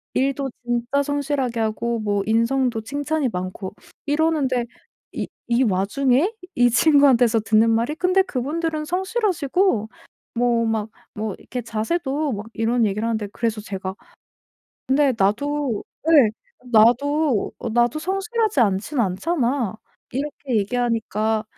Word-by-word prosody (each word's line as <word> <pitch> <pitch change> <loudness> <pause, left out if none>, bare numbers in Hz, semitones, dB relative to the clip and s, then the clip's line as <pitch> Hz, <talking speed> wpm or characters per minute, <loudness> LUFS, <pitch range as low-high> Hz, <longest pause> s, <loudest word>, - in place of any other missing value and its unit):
일도 275 +1 0 0.2
진짜 240 +4 0
성실하게 280 -4 -1
하고 225 +1 -1
뭐 205 -2 0
인성도 230 +1 +1
칭찬이 285 +4 -1
많고 185 +1 -5 0.3
이러는데 290 -5 +1 0.5
이 - - -3 0.2
이 240 +2 +4
와중에 250 - +2 0.2
이 245 0 +4
친구한테서 250 -3 +4
듣는 220 +1 +3
말이 230 +6 0
"근데 365 +3 +3
그분들은 310 0 -2
성실하시고 370 - 0 0.5
뭐 235 -1 +2
막 220 -1 -1 0.3
뭐 215 -1 -3
이렇게 250 - -5
자세도" 270 +6 -2
막 205 +1 -5
이런 230 +1 +1
얘기를 210 +2 -1
하는데 220 -2 -1
그래서 225 -2 -2
제가 190 -2 -5 0.9
근데 275 0 +3
나도 235 +4 0 0.3
예 280 -9 +6 0.4
나도 250 +3 +3
어 - - -4
"나도 240 +4 +2
성실하지 390 - 0
않지는 215 +6 +1
않잖아." 240 - -1 0.4
이렇게 275 -1 -3
얘기하니까 220 -1 0
245 Hz, 280 characters per minute, -22 LUFS, 220-290 Hz, 0.9 s, 예